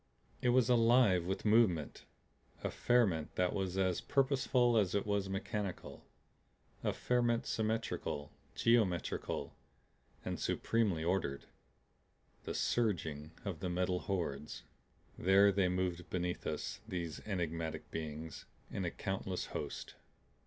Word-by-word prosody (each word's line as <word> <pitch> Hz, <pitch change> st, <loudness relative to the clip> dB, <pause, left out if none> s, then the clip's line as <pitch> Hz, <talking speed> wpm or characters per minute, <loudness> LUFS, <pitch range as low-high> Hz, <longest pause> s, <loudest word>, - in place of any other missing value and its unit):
It 125 Hz, -, +2 dB
was 125 Hz, -1 st, +4 dB
alive 115 Hz, -6 st, +5 dB
with 95 Hz, +3 st, -2 dB
movement. 105 Hz, -9 st, +3 dB, 0.6 s
A -, -, -1 dB
ferment 100 Hz, -11 st, +2 dB
that 90 Hz, -1 st, +1 dB
was 95 Hz, -2 st, -2 dB
as 95 Hz, -2 st, +1 dB
purposeful 130 Hz, -3 st, +2 dB
as 100 Hz, -4 st, +3 dB
it 100 Hz, -, +1 dB
was 100 Hz, -2 st, 0 dB
mechanical, 95 Hz, 0 st, -4 dB, 0.8 s
a -, -, +2 dB
ferment 120 Hz, -1 st, +1 dB
symmetrical, 110 Hz, -9 st, -2 dB, 0.2 s
geometrical, 105 Hz, -, +1 dB, 0.8 s
supremely 105 Hz, -8 st, +1 dB
ordered 85 Hz, -6 st, -1 dB, 1.0 s
The -, -, -3 dB
surging 80 Hz, -10 st, 0 dB, 0.2 s
of 95 Hz, -6 st, -3 dB
the 90 Hz, -, -2 dB
Metal 90 Hz, 0 st, 0 dB
Hordes. 75 Hz, -8 st, -3 dB, 0.6 s
There 100 Hz, +2 st, +6 dB
they 95 Hz, -1 st, +2 dB
moved 90 Hz, -1 st, -2 dB
beneath 90 Hz, -1 st, -2 dB
us, 105 Hz, -, -3 dB
these 85 Hz, -6 st, -4 dB
enigmatic 85 Hz, -5 st, -3 dB
beings, 80 Hz, 0 st, -5 dB, 0.3 s
in 95 Hz, -, -2 dB
a -, -, +1 dB
countless 95 Hz, 0 st, -3 dB
host. -, -, -5 dB
95 Hz, 115 wpm, -35 LUFS, 85-110 Hz, 1.0 s, There